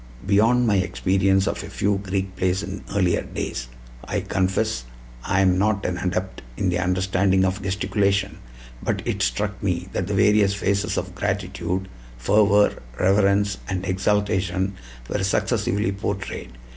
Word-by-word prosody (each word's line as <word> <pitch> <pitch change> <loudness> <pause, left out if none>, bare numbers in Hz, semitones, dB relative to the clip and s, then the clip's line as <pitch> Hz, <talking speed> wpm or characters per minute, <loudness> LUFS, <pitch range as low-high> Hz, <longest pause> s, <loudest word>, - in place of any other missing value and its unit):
Beyond 110 +5 +4
my 105 -3 +3
experience 95 +1 +2
of - - -2
a - - -8
few 100 0 0
Greek 95 -1 -3
plays 95 +2 0
in 100 -1 -6
earlier 90 -4 +2
days, - - -5 0.4
I - - -2
confess 95 -10 0 0.4
I 95 - +1
am 95 -1 +3
not 105 0 +1
an 90 -1 -1
adept 90 +1 -2 0.2
in 95 - +1
the 90 0 0
understanding 95 +1 +2
of 95 +2 -1
gesticulation; 100 +1 0 0.4
but - - -2
it - - -2
struck - - -1
me - - -1
that - - -1
the 100 - -1
various 105 -1 +4
phases 100 +1 0
of 95 -1 -3
gratitude, 95 -2 -2 0.3
fervor, 105 - +3 0.2
reverence, 100 +1 +3
and 95 -1 -2
exaltation 95 0 0 0.3
were 95 - -2
successively 100 0 +1
portrayed. 100 - -4
95 Hz, 145 wpm, -23 LUFS, 95-100 Hz, 0.4 s, Beyond